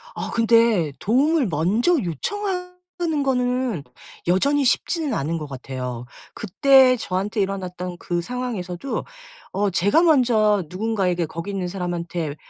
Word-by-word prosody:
어 - - -4
근데 230 -8 +3
도움을 275 +4 +2
먼저 190 - +2
요청하는 360 - -3
건 250 - 0 0.4
여전히 275 +11 +2
쉽지는 305 +4 0
않은 160 +4 -1
것 150 -2 -6
같아요. 125 -2 -6 0.3
그때 255 +5 +4
저한테 205 +2 -2
일어났던 180 -2 -4
그 175 -1 -2
상황에서도 225 -1 -4 0.5
어 205 +1 0
제가 195 - +3
먼저 230 - +3
누군가에게 185 -3 -1
거기 165 +5 -6
있는 190 -2 -3
사람한테 175 -4 -4
205 Hz, 280 characters per minute, -22 LUFS, 175-260 Hz, 0.5 s, 그때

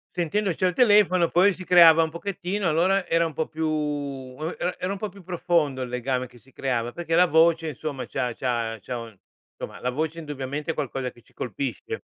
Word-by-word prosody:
Sentendoci 185 +2 0
al 180 - +2
telefono 205 -6 +4
poi 190 +3 +4
si 185 - -9
creava 170 -3 +7
un 160 - -1
pochettino, 190 +3 -3
allora 180 +4 +2
era 165 0 +2
un 165 - -3
po' 160 +2 -2
più 160 0 -3 0.9
era 180 +1 -2
era 185 - -3
un 200 - -3
po' 215 - -3
più 200 -1 -14
profondo 170 -6 0
il - - -5
legame 125 +1 -2
che 120 - -18
si 135 +3 -22
creava, 120 -3 -2
perché 165 +3 -2
la 180 +1 +6
voce 165 0 +3
insomma 145 -1 -5
c'ha 125 -3 -2
c'ha 115 -3 -2
c'ha 125 - -5
un 115 -3 -9 0.4
insomma, - - -7
la 125 - -1
voce 155 +5 -2
indubbiamente 145 0 -4
è - - -4
qualcosa 135 -4 -3
che 120 - -20
ci - - -28
colpisce. 125 +2 -4
160 Hz, 205 wpm, -25 LUFS, 130-180 Hz, 0.9 s, creava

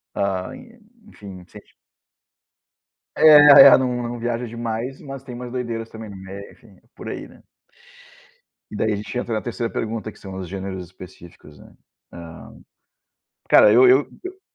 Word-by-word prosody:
ah, 95 -2 -3
e 240 -1 -16 0.3
enfim, 95 - -13
sente 105 +1 -17 1.5
É, 150 -2 +8
é, 135 - +8
não 125 -2 -2
não 120 0 -6
viaja 120 +1 -3
demais, 115 +3 -6
mas 135 -1 -10
tem 125 - -10
umas 120 0 -8
doideiras 115 -3 -5
também 110 0 -10
no 100 - -11
meio, 95 +1 -11
enfim, - - -22 0.2
por - - -9
aí, - - -7
né. - - -20 1.3
E, - - -8
daí, 110 +1 -1
a - - -2
gente 105 +4 -7
entra 120 -2 -4
na 110 - -2
3° 120 -1 -5
pergunta 110 0 -5
que - - -21
são 95 -1 -10
os 95 -1 -7
gêneros 95 0 -7
específicos, 85 -3 -15
né. - - -18 0.4
Hã, 85 -1 -12 0.9
cara 105 - +6
eu 125 +2 +6
eu 130 +3 +3 0.2
eu 370 +1 -9
115 Hz, 165 wpm, -21 LUFS, 95-125 Hz, 1.5 s, É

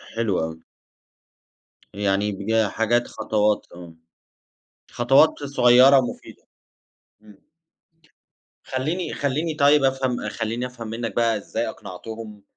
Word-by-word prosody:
حلو 115 -5 0
أوي. 80 0 -7 1.3
يعني 100 +1 0
بج 110 +3 0
حاجات 120 +2 0
خطوات 105 -1 0
تمام. 85 -2 -13 0.9
خطوات 135 +5 +3
صغيرة 135 0 +6
مفيدة. 120 - -8 0.8
إمم. 105 -2 -18 1.3
خلّيني 155 +8 -3
خلّيني 150 +4 -2
طيب 145 -1 +4
أفهم 130 -4 0
خلّيني 115 +3 -3
أفهم 120 -3 -8
منك 115 +1 -5
بقى 115 -2 +2
إزاي 100 - -4
أقنَعتهُم 105 +2 -9
115 Hz, 100 wpm, -23 LUFS, 105-130 Hz, 1.3 s, صغيرة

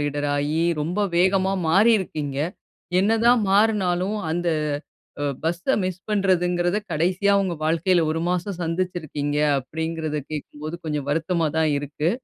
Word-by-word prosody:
Leader 145 0 -1
ஆயி 150 +3 0 0.2
ரொம்ப 175 +7 -1 0.2
வேகமா 190 +2 +3 0.2
மாறியிருக்கீங்க. 180 -7 +2 0.6
என்னதான் 225 +3 +4
மாறுனாலும், 200 -1 +2
அந்த 175 +1 -1 0.7
அ, - - 0 0.2
பஸ்ஸை 175 +10 0
மிஸ் 185 -1 -3
பண்ணுறதுங்கிறத 180 -2 +1
கடைசியா 180 +5 +2
உங்க 185 -3 -2
வாழ்க்கையில 170 +2 +2
1 160 +1 -1
மாசம் 180 +1 -1
சந்துச்சிருக்கீங்க 165 -4 -2 0.2
அப்படிங்கிறத 160 +2 -3
கேக்கும்போது 155 +1 -6
கொஞ்சம் 150 -2 -2
வருத்தமா 165 +2 0
தான் 160 -1 +3
இருக்கு. 145 +3 -2
175 Hz, 120 wpm, -23 LUFS, 155-190 Hz, 0.7 s, என்னதான்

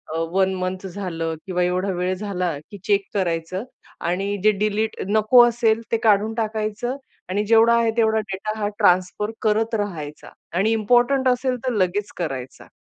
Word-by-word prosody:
अ, - - -1
1 190 0 +2
month 185 +1 -4
झालं 170 -4 -4
किंवा 180 -2 0
एवढा 180 +2 0
वेळ 180 0 -1
झाला, 180 -5 -3
की 205 - -8
चेक 200 -1 +2
करायचं 185 0 -2 0.4
आणि 195 +3 -1
जे 215 - +6
डिलीट 215 +1 0
नको 215 +4 +6
असेल, 230 -1 +1
ते 230 - +3
काढून 215 0 +3
टाकायचं 220 +3 -2 0.3
आणि 205 +3 0
जेवढा 230 +1 +5
आहे 230 -1 +2
तेवढा 220 -1 +3
डेटा 215 +3 -4
हा 205 - 0
ट्रान्सफर 185 +4 +2
करत 220 +2 +1
राहायचा 165 -8 -5 0.3
आणि 215 +4 +2
इम्पोर्टंट 245 +5 +3
असेल, 255 +1 +1
तर 250 - 0
लगेच 200 +1 0
करायचा. 135 -7 -5
205 Hz, 160 wpm, -22 LUFS, 185-220 Hz, 0.4 s, जे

